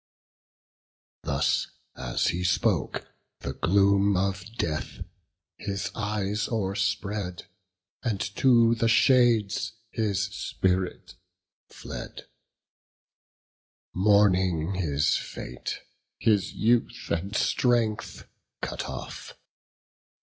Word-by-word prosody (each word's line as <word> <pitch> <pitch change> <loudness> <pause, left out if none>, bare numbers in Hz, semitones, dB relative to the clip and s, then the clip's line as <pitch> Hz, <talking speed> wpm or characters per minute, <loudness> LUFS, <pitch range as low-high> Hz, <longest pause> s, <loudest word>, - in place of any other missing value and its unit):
Thus 70 +1 +1 0.3
as - - 0
he 90 +1 -2
spoke, 90 - +1 0.4
the - - -4
gloom 100 +1 +3
of 95 0 0
death 75 -2 -3 0.5
his 100 -1 -3
eyes 105 -1 -1
O'erspread, 100 -3 -2 0.6
and 110 -5 -1 0.2
to 115 -3 +5
the 115 0 +1
shades 115 -3 +3 0.2
his 100 -3 0
spirit 95 -2 -1 0.6
fled, - - -8 1.7
Mourning 95 -3 +3
his 75 -5 +1
fate, 60 - -6 0.4
his 105 -3 +2
youth 120 +2 +1
and 95 +6 -2
strength 115 -3 +1 0.3
cut - - -4
off. 65 -2 -7
100 Hz, 80 wpm, -27 LUFS, 90-110 Hz, 1.7 s, to